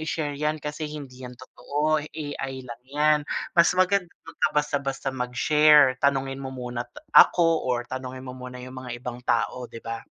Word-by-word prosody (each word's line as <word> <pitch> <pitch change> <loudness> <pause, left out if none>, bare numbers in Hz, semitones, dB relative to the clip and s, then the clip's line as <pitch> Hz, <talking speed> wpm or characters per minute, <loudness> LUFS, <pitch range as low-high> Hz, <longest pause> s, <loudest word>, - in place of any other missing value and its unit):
i-share 155 -2 -2
'yan 150 +2 -1
kasi 150 +1 -5
hindi 140 -4 -9
'yan 125 -1 -9
totoo, 150 +4 -1
AI 145 -3 -6
lang 120 0 -9
'yan. 150 +1 +3 0.3
Mas 170 +1 +4
maganda 185 -1 +2 0.2
'wag - - -13
ka - - +4
basta-basta 140 -2 -1
mag-share. 130 +2 +4
Tanungin 135 -1 0
mo 135 - -5
muna 125 -2 -5
ta 295 +1 -15
ako 165 -2 +6
or 120 -1 0
tanungin 130 0 -7
mo 130 - -7
muna 125 0 -9
yung 130 0 -8
mga 125 -1 -6
ibang 125 0 -7
tao 125 0 -1
di 115 - -11
ba?" 115 0 -4
135 Hz, 175 wpm, -25 LUFS, 125-150 Hz, 0.3 s, ako